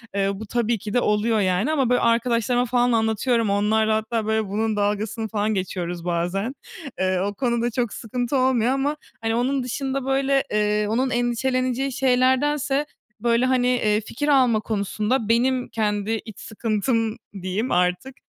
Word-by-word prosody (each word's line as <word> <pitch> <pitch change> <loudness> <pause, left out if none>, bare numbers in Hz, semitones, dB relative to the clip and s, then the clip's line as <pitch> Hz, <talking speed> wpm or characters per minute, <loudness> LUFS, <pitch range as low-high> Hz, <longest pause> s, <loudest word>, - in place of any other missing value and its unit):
Eee, 195 0 +1
bu 215 +3 -7
tabii 235 +1 0
ki 205 +1 -7
de 245 - +3
oluyor, 210 +1 +1
yani 190 +9 +1
ama 270 -6 +1
böyle 245 - +3
arkadaşlarıma 235 +1 +2
falan 245 0 +2
anlatıyorum. 225 0 +1
Onlarla 215 +2 +2
hatta 220 0 -2
böyle 220 -1 0
bunun 220 +2 -1
dalgasını 210 +2 -1
falan 215 0 -1
geçiyoruz 180 -2 -3
bazen. 180 +9 -1 0.4
Eee, 185 -1 +1
o 200 +2 -1
konuda 235 0 0
çok 240 -2 -1
sıkıntı 245 +4 -2
olmuyor 255 -2 +2
ama 280 +3 0 0.2
hani, 225 0 0
onun 260 +2 0
dışında 265 +1 -3
böyle, 270 0 +2
eee, 210 0 +1
onun 255 +4 +1
endişeleneceği 255 +2 0
şeylerdense 270 +3 +2 0.3
böyle 235 +2 +2
hani, 255 -1 +2
eee, 220 -4 +2
fikir 290 +7 -4
alma 255 -6 +4
konusunda 215 +2 -1
benim 250 +2 +2
kendi 210 -1 -1
iç 220 -3 -10
sıkıntım 225 +1 -1 0.2
diyeyim 190 +7 -2
artık, 180 +9 0
230 Hz, 155 wpm, -23 LUFS, 210-255 Hz, 0.4 s, alma